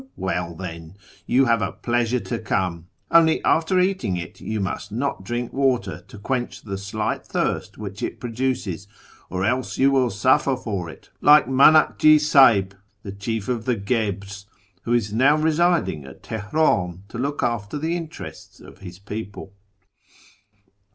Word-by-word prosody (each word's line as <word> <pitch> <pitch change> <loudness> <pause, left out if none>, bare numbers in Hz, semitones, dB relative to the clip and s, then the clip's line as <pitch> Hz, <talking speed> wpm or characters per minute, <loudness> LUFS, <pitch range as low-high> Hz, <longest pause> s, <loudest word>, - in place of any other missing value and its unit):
Well, 90 -3 -3
then, 85 -1 -8 0.3
you 135 +2 +4
have 115 -2 +2
a 100 - -1
pleasure 120 0 0
to 115 - -4
come; 90 -6 -2 0.2
only 160 -1 +5
after 165 +3 +2
eating 180 - 0
it 85 - -8
you 110 0 -3
must 100 +1 -4
not 125 -2 -3
drink 120 +4 -4
water 125 -10 0
to - - -12
quench 125 +4 -3
the 100 -2 -5
slight 105 +2 -3
thirst - - -2
which 100 -1 -7
it - - -4
produces, 115 -6 -3 0.4
or 95 +1 -2
else 125 +3 -1
you 135 +1 +4
will 130 -3 +2
suffer 130 +6 +2
for 100 -9 -4
it, - - -14
like 150 +1 +7
Manakji 155 +3 +5
S;ihib, 135 -10 +5 0.3
the 100 - -6
chief 100 +2 -4
of 120 -3 -2
the 125 - +1
Guebres, 100 -2 -3 0.4
who 120 - 0
is 110 -4 0
now 135 +6 +4
residing 160 - +1
at 70 - -13
Teheran 100 - 0
to 115 - -7
look 140 +3 -2
after 115 0 -2
the 160 +3 -1
interests 165 -3 -8
of - - -15
his 90 -2 -10
people. 100 0 -8
115 Hz, 155 wpm, -23 LUFS, 100-135 Hz, 0.4 s, like